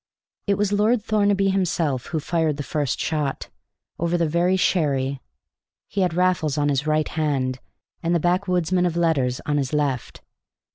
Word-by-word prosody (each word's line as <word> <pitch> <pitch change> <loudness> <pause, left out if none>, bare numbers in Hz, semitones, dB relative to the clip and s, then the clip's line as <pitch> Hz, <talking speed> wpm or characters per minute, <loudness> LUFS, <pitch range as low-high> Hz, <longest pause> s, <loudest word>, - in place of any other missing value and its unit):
It 200 - +3
was 205 -1 0
Lord 210 +2 +2
Thornaby 200 -2 +2
himself 170 -9 0
who 160 - -2
fired 160 -1 0
the 145 - -3
first 145 -2 -2
shot, 150 -3 -2 0.5
over 170 +1 +1
the 170 -1 +1
very 175 +4 +2
sherry. 140 -7 +1 0.7
He 195 - -2
had 180 -3 +1
Raffles 180 -5 +1
on 145 0 +2
his 140 +1 0
right 155 0 +2
hand, 135 -5 -1 0.4
and 170 +1 +1
the - - +3
backwoodsman 180 0 +1
of 170 -1 -3
letters 140 -7 +1
on 145 -1 0
his 135 0 -2
left. 140 -5 -2
160 Hz, 160 wpm, -23 LUFS, 145-180 Hz, 0.7 s, It